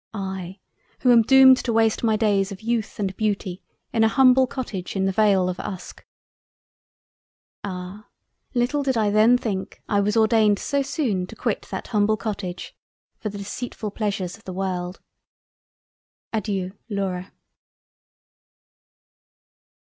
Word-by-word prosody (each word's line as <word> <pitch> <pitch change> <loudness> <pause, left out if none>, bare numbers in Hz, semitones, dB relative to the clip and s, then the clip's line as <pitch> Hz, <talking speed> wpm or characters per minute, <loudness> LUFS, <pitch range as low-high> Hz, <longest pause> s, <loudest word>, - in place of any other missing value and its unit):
I 190 -2 -5 0.4
who 250 - +5
am 235 -1 +7
doomed 260 +2 +7
to 240 - -2
waste 225 0 +2
my 220 -2 +3
Days 205 -2 +1
of 195 - -7
Youth 230 -1 -2
and 190 -2 -2
Beauty 200 -4 -2 0.3
in 225 - +3
an 220 - +5
humble 260 0 +5
Cottage 220 -9 -5
in 190 0 +1
the 195 - +1
Vale 195 -2 +3
of 185 0 -3
Uske." 190 -3 -7 1.6
Ah! 190 +2 -7 0.5
little 245 +4 +1
did 265 -3 0
I 210 -2 +2
then 220 +4 +5
think 200 -6 -5
I 205 - +2
was 210 +2 +1
ordained 220 -2 +4
so 280 +5 -1
soon 255 - -1
to - - -11
quit - - -2
that - - -6
humble 215 -1 +2
Cottage 195 -5 -5 0.4
for 215 - -3
the 205 - -7
Deceitfull 205 +1 -5
Pleasures 200 -4 -2
of 220 - -23
the 185 - -6
World. 185 -1 -3 1.3
Adeiu. 195 -3 -2
Laura. 195 -2 -3
210 Hz, 140 wpm, -23 LUFS, 190-230 Hz, 1.6 s, am